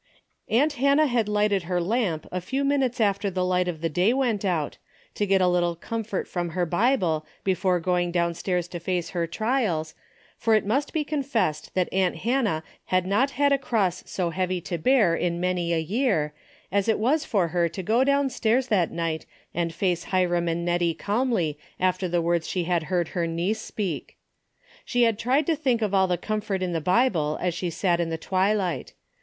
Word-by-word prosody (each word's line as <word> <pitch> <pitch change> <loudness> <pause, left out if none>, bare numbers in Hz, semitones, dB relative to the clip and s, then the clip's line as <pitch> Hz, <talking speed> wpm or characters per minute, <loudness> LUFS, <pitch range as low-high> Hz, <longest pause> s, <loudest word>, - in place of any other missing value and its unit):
Auot 280 +8 +3
Hannah 280 +3 +3
had 240 -6 +1
lighted 210 -1 +2
her 180 -1 +1
lamp 180 -4 0
a 180 - -2
few 265 +10 -2
minutes 270 -4 +1
after 200 -2 +1
the 185 -1 -1
light 180 0 +1
of 165 -3 -4
the 165 - +1
day 180 +8 +2
Avent 245 -6 0
out, 170 -7 -1 0.3
to 205 - -1
get 195 -1 +3
a 180 - +4
little 175 -1 +1
comfort 220 +3 -4
from 175 -1 -3
her 180 - +2
Bible 175 - +1 0.2
before 185 -1 +1
going 175 0 0
downstairs 175 +1 -1
to 175 - -6
face 175 0 -2
her 170 -2 -1
trials, 210 -6 -1 0.5
for 225 -1 +3
it 215 - +2
must 275 +8 0
be 315 - 0
confessed 260 - -1
that 185 -1 +2
aunt 185 -1 +2
Hannah 225 -10 0 0.2
had 185 -1 +1
not 210 +9 +2
had 285 0 +3
a 280 - +3
cross 200 -9 0
so 175 -3 -2
heavy 185 +1 -1
to 170 0 -4
beaif 200 -4 +3
in 170 -1 -1
many 180 -1 0
a 170 - +2
year, 170 - 0 0.4
as 200 +1 +1
it 220 - +3
was 280 +8 +2
for 195 - +1
her 170 0 +1
to 185 +3 -6
go 225 +7 +3
downstairs 265 -3 +1
that 190 -6 +2
night 165 -1 -3 0.3
and 170 0 -1
face 175 0 -1
Hiram 175 -2 +1
and 170 +1 -1
Hettie 175 -1 +1
calmly 205 - 0 0.2
after 185 0 +1
the 175 -1 0
Avords 170 -1 0
she 180 - -1
had 170 -2 0
heard 175 -3 0
her 170 -2 -1
niece 175 +7 -1
speak. 190 -10 -4 0.7
She 245 -1 +1
had 225 -2 +2
tried 265 +5 +2
to 330 - +2
think 255 -6 0
of 205 -2 -1
all 190 -1 +4
the 180 -1 0
comfort 210 0 -2
in 180 -1 -2
the 165 - -1
Bible 180 -5 +2
as 180 -1 0
she 175 +1 -3
sat 170 +1 0
in 170 -1 0
the 165 - -2
tAvilight. 190 +1 0
185 Hz, 195 wpm, -25 LUFS, 170-225 Hz, 0.7 s, a